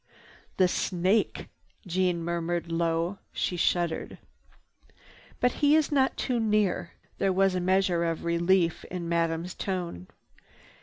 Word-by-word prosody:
"The 185 Hz, -, +5 dB
snake!" 185 Hz, +4 st, 0 dB, 0.4 s
Jeanne 180 Hz, -1 st, 0 dB
murmured 170 Hz, 0 st, -2 dB
low. 165 Hz, +3 st, 0 dB
She 180 Hz, -, -1 dB
shuddered. 175 Hz, -1 st, 0 dB, 1.2 s
"But 250 Hz, -, +3 dB
he 290 Hz, +1 st, +5 dB
is 310 Hz, -1 st, +2 dB
not 270 Hz, -2 st, +2 dB
too 250 Hz, -3 st, -1 dB
near." 210 Hz, -6 st, +1 dB, 0.3 s
There 195 Hz, -, +2 dB
was 195 Hz, 0 st, +3 dB
a 180 Hz, -, 0 dB
measure 185 Hz, -1 st, +2 dB
of 165 Hz, 0 st, -2 dB
relief 170 Hz, 0 st, +2 dB
in 180 Hz, -2 st, -5 dB
Madame's 165 Hz, +1 st, -1 dB
tone. 175 Hz, -, -4 dB
180 Hz, 120 wpm, -28 LUFS, 170-195 Hz, 1.2 s, The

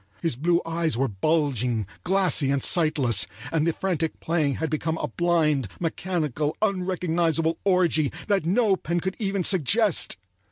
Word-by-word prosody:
His 165 Hz, -7 st, 0 dB
blue 170 Hz, +6 st, +1 dB
eyes 165 Hz, -4 st, -1 dB
were 135 Hz, +2 st, +1 dB
bulging, 125 Hz, -1 st, 0 dB, 0.2 s
glassy 185 Hz, -7 st, +2 dB
and 140 Hz, -1 st, +1 dB
sightless, 150 Hz, -, +3 dB, 0.2 s
and 160 Hz, 0 st, +1 dB
the 165 Hz, -, +1 dB
frantic 165 Hz, -4 st, -2 dB
playing 155 Hz, -5 st, 0 dB
had 160 Hz, 0 st, -3 dB
become 160 Hz, +1 st, -1 dB
a -, -, -3 dB
blind, 155 Hz, -7 st, +1 dB
mechanical, 160 Hz, -4 st, -2 dB
unrecognizable 175 Hz, -5 st, 0 dB
orgy 175 Hz, -6 st, +2 dB, 0.2 s
that 200 Hz, -5 st, +1 dB
no 195 Hz, +4 st, +2 dB
pen 175 Hz, -1 st, -2 dB
could 190 Hz, +2 st, -3 dB
even 195 Hz, -3 st, -1 dB
suggest. 195 Hz, -, +2 dB
165 Hz, 145 wpm, -25 LUFS, 150-180 Hz, 0.2 s, sightless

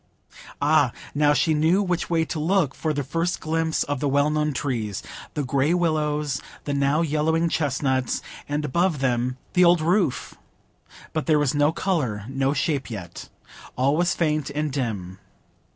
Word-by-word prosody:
Ah, -, -, +3 dB, 0.2 s
now 145 Hz, 0 st, +3 dB
she 150 Hz, +3 st, +2 dB
knew 160 Hz, +6 st, +3 dB
which 180 Hz, -3 st, -1 dB
way 165 Hz, -1 st, +2 dB
to 155 Hz, -, -4 dB
look 165 Hz, -3 st, +1 dB
for 160 Hz, -, -2 dB
the 145 Hz, -1 st, -2 dB
first 165 Hz, +6 st, -1 dB
glimpse 160 Hz, 0 st, 0 dB
of 145 Hz, -2 st, -3 dB
the 145 Hz, -, 0 dB
well 145 Hz, +2 st, +2 dB
known 150 Hz, 0 st, +1 dB
trees—the 125 Hz, +1 st, -4 dB
gray 140 Hz, +5 st, +1 dB
willows, 150 Hz, -4 st, 0 dB, 0.2 s
the 145 Hz, -, -3 dB
now 140 Hz, +3 st, +2 dB
yellowing 160 Hz, +2 st, +1 dB
chestnuts—and 145 Hz, 0 st, -1 dB
above 170 Hz, +3 st, +1 dB
them 125 Hz, -1 st, 0 dB, 0.2 s
the 180 Hz, -, +5 dB
old 175 Hz, 0 st, +6 dB
roof! 170 Hz, -2 st, 0 dB, 0.8 s
But 155 Hz, -, -2 dB
there 155 Hz, -2 st, +4 dB
was 145 Hz, -3 st, +1 dB
no 145 Hz, +1 st, +3 dB
colour, 145 Hz, -, -1 dB
no 135 Hz, 0 st, 0 dB
shape 145 Hz, -2 st, -1 dB
yet; 95 Hz, -7 st, -8 dB, 0.5 s
all 135 Hz, +3 st, +2 dB
was 175 Hz, +3 st, +1 dB
faint 155 Hz, -3 st, 0 dB
and 150 Hz, +1 st, -2 dB
dim. 100 Hz, -9 st, -3 dB
150 Hz, 155 wpm, -24 LUFS, 135-160 Hz, 0.8 s, old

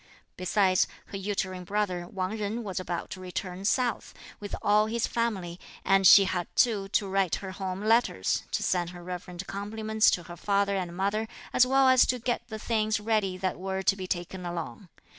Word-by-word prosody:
Besides, 185 Hz, 0 st, +2 dB, 0.2 s
her 195 Hz, -, -4 dB
uterine 190 Hz, -2 st, -3 dB
brother 185 Hz, -2 st, -2 dB
Wang 185 Hz, +2 st, -3 dB
Jen 215 Hz, +2 st, -3 dB
was 195 Hz, -3 st, -3 dB
about 175 Hz, -2 st, -4 dB
to -, -, -6 dB
return 185 Hz, +1 st, -5 dB
south, 240 Hz, 0 st, 0 dB, 0.2 s
with 205 Hz, -1 st, -5 dB
all 210 Hz, +1 st, +4 dB
his 230 Hz, +1 st, 0 dB
family, 190 Hz, -7 st, -2 dB, 0.3 s
and 195 Hz, -1 st, +5 dB
she 200 Hz, -, +9 dB
had 180 Hz, -2 st, -2 dB
too 210 Hz, -5 st, +2 dB
to 200 Hz, 0 st, 0 dB
write 190 Hz, -2 st, +1 dB
her 190 Hz, -1 st, -6 dB
home 190 Hz, +1 st, -4 dB
letters, 220 Hz, -, +2 dB
to -, -, -1 dB
send 175 Hz, -2 st, 0 dB
her 175 Hz, -1 st, -10 dB
reverent 180 Hz, +1 st, -6 dB
compliments 215 Hz, +2 st, +1 dB
to 175 Hz, -, 0 dB
her 175 Hz, +1 st, -10 dB
father 200 Hz, +2 st, +1 dB
and 180 Hz, -2 st, -4 dB
mother, 205 Hz, +3 st, 0 dB, 0.3 s
as 250 Hz, -, +5 dB
well 270 Hz, +1 st, +4 dB
as 260 Hz, -1 st, +6 dB
to 250 Hz, -, +1 dB
get 240 Hz, 0 st, -1 dB
the 220 Hz, -2 st, -6 dB
things 215 Hz, -1 st, 0 dB
ready 210 Hz, -4 st, 0 dB
that 185 Hz, -1 st, -2 dB
were 190 Hz, 0 st, -3 dB
to 195 Hz, -, +3 dB
be 190 Hz, -2 st, -6 dB
taken 180 Hz, +1 st, -4 dB
along. 175 Hz, +2 st, -6 dB
195 Hz, 190 wpm, -28 LUFS, 185-215 Hz, 0.3 s, she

